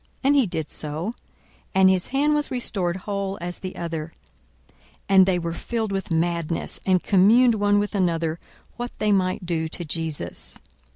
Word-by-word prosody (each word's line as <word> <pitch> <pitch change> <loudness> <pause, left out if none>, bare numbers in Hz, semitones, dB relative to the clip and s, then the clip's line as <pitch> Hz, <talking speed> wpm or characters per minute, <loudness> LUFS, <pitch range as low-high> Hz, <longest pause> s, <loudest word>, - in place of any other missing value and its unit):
And 280 +2 +4
he 270 -6 +4
did 160 -4 -4
so: 155 +8 -3 0.6
and 190 0 +6
his 190 -1 +3
hand 285 +3 +2
was 295 0 0
restored 195 -8 -1
whole 200 0 -3
as 175 +1 -5
the 185 - -6
other. 165 -2 -5 0.6
42:006:011 - - -34 0.4
And 190 -1 +7
they 185 -2 +2
were 170 -1 -3
filled 220 +3 -3
with 195 -1 -3
madness; 170 0 0
and 185 -2 +3
communed 225 +6 +5
one 205 -1 +2
with 205 +1 0
another 165 -4 0 0.4
what 240 0 -3
they 210 -1 +1
might 185 -2 +1
do 165 -2 -1
to 170 +2 -6
Jesus. 160 -1 -4
185 Hz, 170 wpm, -24 LUFS, 170-205 Hz, 0.6 s, And